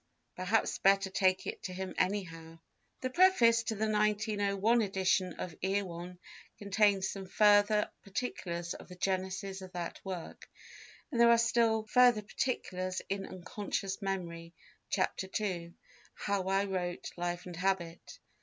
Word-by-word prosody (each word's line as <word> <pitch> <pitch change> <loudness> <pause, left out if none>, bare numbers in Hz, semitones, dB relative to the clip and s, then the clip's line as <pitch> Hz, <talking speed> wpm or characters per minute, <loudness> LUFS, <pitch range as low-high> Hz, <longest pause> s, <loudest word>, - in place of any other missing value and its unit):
Perhaps 185 +5 0
better 195 0 +3
take 185 0 +2
it - - -5
to 185 - -5
him 190 +1 -5
anyhow." 165 -4 -2 0.4
The 255 0 -2
preface 255 -10 +5
to 220 - -1
the 220 +1 0
1901 210 +1 +2
edition 190 -2 +1
of 170 0 -6
Erewhon 180 -2 -2 0.4
contains 200 -1 +2
some 195 -1 -6
further 210 +1 +4 0.2
particulars 175 -5 -4
of - - -11
the 180 - -10
genesis 190 +1 -2
of 185 -1 -10
that 175 -1 -5
work, 185 -3 -7 0.6
and 235 -4 +1
there 235 - +7
are 235 - +7
still 230 -1 +2
further 240 0 +4
particulars 185 -5 -3
in 195 0 -2
Unconscious 195 +2 -4
Memory, 170 -4 -4 0.3
Chapter 190 - -1
II, 175 -5 -3 0.4
"How 200 -2 -2
I 195 +1 +2
wrote 180 -2 -3
Life 175 0 -3
and 180 -1 -7
Habit." 180 -2 -2
195 Hz, 135 wpm, -32 LUFS, 180-210 Hz, 0.6 s, there